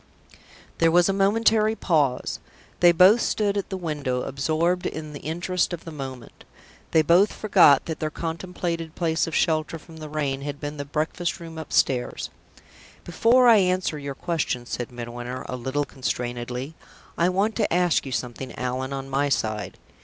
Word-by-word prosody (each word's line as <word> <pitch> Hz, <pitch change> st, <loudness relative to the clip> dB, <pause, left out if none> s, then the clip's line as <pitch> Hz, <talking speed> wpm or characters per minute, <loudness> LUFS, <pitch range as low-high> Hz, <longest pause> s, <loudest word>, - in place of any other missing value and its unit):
There 165 Hz, -, +5 dB
was 175 Hz, +2 st, +4 dB
a -, -, +2 dB
momentary 215 Hz, +2 st, +3 dB
pause. 150 Hz, -, 0 dB, 0.4 s
They 175 Hz, -1 st, +7 dB
both 190 Hz, +7 st, +6 dB
stood 205 Hz, -2 st, +1 dB
still 205 Hz, -, 0 dB
at 195 Hz, -, -6 dB
the 190 Hz, -, -3 dB
window, 145 Hz, -7 st, -2 dB
absorbed 160 Hz, +6 st, 0 dB
in 155 Hz, -1 st, -6 dB
the 145 Hz, -, -7 dB
interest 175 Hz, +3 st, -1 dB
of 170 Hz, -, -6 dB
the 165 Hz, -, -7 dB
moment. 130 Hz, -5 st, -8 dB, 0.5 s
They 160 Hz, -, +4 dB
both 175 Hz, +6 st, +4 dB
forgot 180 Hz, -10 st, +5 dB
that 160 Hz, -, -4 dB
their 155 Hz, -, -1 dB
contemplated 165 Hz, 0 st, -4 dB
place 165 Hz, -2 st, 0 dB
of 165 Hz, -, -4 dB
shelter 160 Hz, -1 st, +1 dB
from 160 Hz, +1 st, -14 dB
the 155 Hz, -1 st, -8 dB
rain 140 Hz, -3 st, -2 dB
had 145 Hz, 0 st, -5 dB
been 145 Hz, +1 st, -5 dB
the 145 Hz, -, -4 dB
breakfast 155 Hz, +4 st, -2 dB
room 165 Hz, -1 st, -8 dB
upstairs. 130 Hz, -5 st, 0 dB, 0.7 s
"Before 235 Hz, +8 st, +4 dB
I 230 Hz, -2 st, +8 dB
answer 185 Hz, -5 st, +1 dB
your 140 Hz, -1 st, -5 dB
question," 150 Hz, -8 st, -2 dB
said 120 Hz, 0 st, -5 dB
Midwinter, 120 Hz, +1 st, -6 dB
a 125 Hz, -, -4 dB
little 130 Hz, +4 st, -2 dB
constrainedly, 125 Hz, +1 st, -4 dB, 0.4 s
"I 170 Hz, +1 st, +2 dB
want 200 Hz, +4 st, 0 dB
to 215 Hz, -, 0 dB
ask 175 Hz, -2 st, +2 dB
you 135 Hz, -, -7 dB
something, 125 Hz, +2 st, -4 dB
Allan, 130 Hz, +2 st, -3 dB
on 135 Hz, 0 st, -5 dB
my 140 Hz, +1 st, 0 dB
side. 110 Hz, -5 st, -2 dB
155 Hz, 170 wpm, -24 LUFS, 135-180 Hz, 0.7 s, I